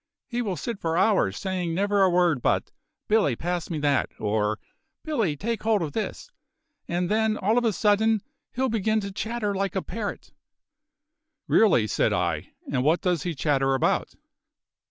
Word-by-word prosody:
He 245 -2 -3
will 200 -6 -2
sit 215 +7 -4
for 165 0 -1
hours, 185 - +2
saying 180 -3 -2
never 200 +2 +2
a 190 - +5
word 175 -6 +2
but: - - +1 0.4
`Billy, 205 - +2
pass 175 -1 -3
me 165 - -2
that,' 145 -2 +2
or 105 0 0 0.5
`Billy, 225 - 0
take 230 +1 -2
hold 215 -4 +2
of 150 - -3
this,' 220 - -4 0.6
and 175 +1 -1
then 220 +2 +1
all 210 +4 +1
of 245 -1 +2
a 225 - +3
sudden 210 +1 +2 0.3
he'll 260 +1 0
begin 220 -1 +1
to 200 0 -5
chatter 220 +1 -2
like 195 -1 -2
a 190 - +1
parrot." 210 -2 -6 1.1
"Really!" 200 - +4
said 110 - +1
I. - - -1 0.2
"And 125 - +1
what 160 +5 +3
does 180 -4 +1
he 175 -3 -3
chatter 135 -2 +1
about?" 130 - 0
190 Hz, 170 wpm, -25 LUFS, 160-220 Hz, 1.1 s, a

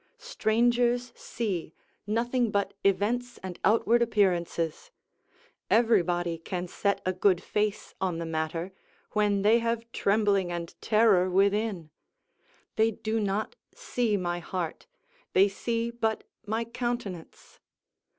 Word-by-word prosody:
Strangers 240 - +1
see 195 -9 -4 0.3
nothing 235 +2 +1
but 200 -1 0
events 220 +6 +1
and 185 -2 -6
outward 230 +3 +3
appearances; 180 - 0 0.8
everybody 175 -7 +2
can 180 +2 -4
set 200 +3 -1
a 185 - +1
good 185 -1 +2
face 210 0 -2
on 185 -3 0
the 170 - -4
matter, 165 +3 -3 0.4
when 205 -2 +1
they 220 +3 +5
have 230 0 -1
trembling 200 -4 +2
and 170 -1 -5
terror 210 -5 +4
within: 195 -3 +1 0.9
they 220 +1 +4
do 220 +1 -2
not 210 - -1 0.2
see 245 - 0
my 175 -2 -2
heart, 175 - -5 0.5
they 195 +2 +6
see 230 +3 -2
but 225 -2 -1 0.2
my 225 +2 -1
countenance. 235 -7 -5
205 Hz, 115 wpm, -28 LUFS, 180-230 Hz, 0.9 s, they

